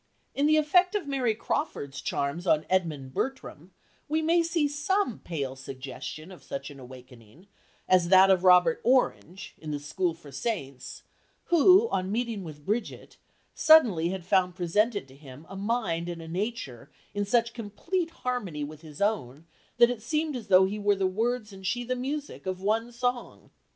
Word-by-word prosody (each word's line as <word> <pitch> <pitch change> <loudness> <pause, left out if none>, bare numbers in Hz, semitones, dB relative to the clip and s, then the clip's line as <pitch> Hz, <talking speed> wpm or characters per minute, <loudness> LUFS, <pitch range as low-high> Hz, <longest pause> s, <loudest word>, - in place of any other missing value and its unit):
In 285 +1 +1
the 310 0 +4
effect 360 +6 +3
of 400 -6 -1
Mary 255 -5 0
Crawford's 145 - -3
charms 145 +6 -2
on 155 -1 +3
Edmund 155 -8 -1
Bertram 195 - -4 0.4
we 315 +1 0
may 335 +2 +3
see 330 -2 +1
some 290 - -1
pale 140 -6 -4
suggestion 135 +5 -8
of 185 - -13
such 140 +1 -6
an 140 - -12
awakening 125 - -14 0.4
as 180 -2 +3
that 190 +1 +7
of 185 -1 +3
Robert 180 +5 +5
Orange 215 -7 0
(in 155 - -8
The 150 - -2
School 165 +4 -2
for 155 -4 -14
Saints), 135 - -5 0.5
who, 370 +7 +6
on 185 +1 -1
meeting 230 -3 -2
with 150 -3 -10
Brigit, 220 +3 -3 0.4
"suddenly 225 - +5
had 185 -2 -5
found 180 -2 +2
presented 200 - 0
to 130 - -16
him 140 +1 -13
a 195 - -10
mind 195 -5 -1
and 170 -1 -5
a 165 - -9
nature 170 - -4 0.2
in 205 - -1
such 235 +3 +1
complete 325 - -3
harmony 245 - -4
with 150 +1 -8
his 155 +2 -5
own 160 - -2 0.3
that 240 - +5
it 245 - -4
had - - -20
seemed 305 +5 -1
as 240 -4 -6
though 185 0 +6
he 205 +3 -3
were 205 0 +2
the 195 -1 -1
words 220 +3 -1
and 190 -1 -7
she 245 +6 -1
the 255 +1 -2
music, 275 -2 -5
of 185 -1 -3
one 220 +4 0
song." 245 0 -3
195 Hz, 175 wpm, -27 LUFS, 160-245 Hz, 0.5 s, that